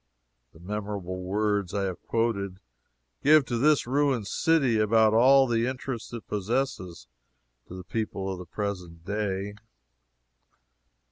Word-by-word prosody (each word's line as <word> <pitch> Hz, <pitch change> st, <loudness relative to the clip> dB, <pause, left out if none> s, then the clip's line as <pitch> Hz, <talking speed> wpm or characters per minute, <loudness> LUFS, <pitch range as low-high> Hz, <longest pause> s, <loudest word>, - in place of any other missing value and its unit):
The 80 Hz, -, -18 dB
memorable 100 Hz, -1 st, -5 dB
words 100 Hz, 0 st, -1 dB
I 100 Hz, -, 0 dB
have 95 Hz, -2 st, -4 dB
quoted 100 Hz, -5 st, -1 dB, 0.6 s
give 150 Hz, -1 st, +6 dB
to 120 Hz, -2 st, -2 dB
this 150 Hz, +2 st, +3 dB
ruined 135 Hz, -3 st, +1 dB
city 135 Hz, -, +2 dB
about 110 Hz, 0 st, +4 dB
all 135 Hz, +4 st, +6 dB
the 115 Hz, -1 st, +1 dB
interest 130 Hz, -2 st, -5 dB
it 115 Hz, -2 st, -7 dB
possesses 100 Hz, -, -2 dB, 0.6 s
to 90 Hz, +1 st, -8 dB
people 100 Hz, -2 st, -3 dB
of 95 Hz, -, -5 dB
the 90 Hz, -, -9 dB
present 90 Hz, -4 st, -5 dB
day. 100 Hz, -1 st, -2 dB
105 Hz, 125 wpm, -27 LUFS, 95-120 Hz, 0.6 s, give